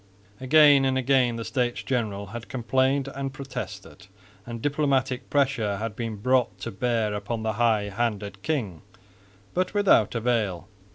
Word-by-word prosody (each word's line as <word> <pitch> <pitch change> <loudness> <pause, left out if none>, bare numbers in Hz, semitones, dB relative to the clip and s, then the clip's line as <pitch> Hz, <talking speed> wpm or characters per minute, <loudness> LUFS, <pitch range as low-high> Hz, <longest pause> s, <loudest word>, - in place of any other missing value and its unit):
Again 145 +1 +6
and 130 0 +1
again 130 -2 +2
the 115 -1 -5
States 125 -3 -1
General 110 -6 -2
had 120 -1 -7
complained 130 +2 +1
and 135 0 -4
protested; 135 -6 -8 0.4
and 120 -1 -5
diplomatic 135 -2 0
pressure 130 -8 +1
had 110 0 -4
been 115 -2 -4
brought 120 -2 +1
to 115 - -4
bear 110 0 0
upon 105 +2 -4
the 110 0 -1
high 110 -1 +2
handed 100 -2 -3
king, 110 - -2 0.7
but 185 +2 -1
without 190 - +4
avail. 110 -6 -1
120 Hz, 140 wpm, -25 LUFS, 110-135 Hz, 0.7 s, Again